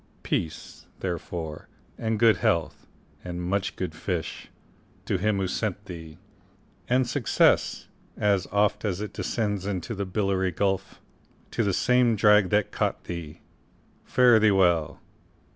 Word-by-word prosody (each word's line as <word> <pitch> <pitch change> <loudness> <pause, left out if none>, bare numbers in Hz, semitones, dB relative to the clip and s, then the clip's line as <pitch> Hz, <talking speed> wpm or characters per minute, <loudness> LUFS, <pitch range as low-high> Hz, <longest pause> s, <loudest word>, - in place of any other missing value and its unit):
Peace, 80 - -4
therefore, 85 -3 -5 0.3
and 110 -1 -1
good 115 0 +5
health, 85 -2 -1 0.4
and 90 -1 -5
much 95 +2 -1
good - - -4
fish, - - -4 0.6
To 95 - 0
him 105 +1 +1
who 95 - 0
sent 105 +1 -3
thee! 80 -4 -9 0.7
and 125 0 +3
success, 125 -1 +2 0.3
as 100 -2 +1
oft 105 +1 +1
As 100 -4 -1
it 105 0 -5
descends 105 -1 -2
into 100 +3 -3
the 100 -2 -4
billowy 95 -1 0
gulf, 95 +2 -1 0.5
To 115 - 0
the 100 - +1
same 125 +3 +3
drag 105 -2 +5
that 105 0 +1
caught - - -1
thee! 85 -3 -7 0.6
Fare 125 -3 +5
thee 110 0 +5
well! 90 -5 +2
100 Hz, 135 wpm, -26 LUFS, 90-110 Hz, 0.7 s, good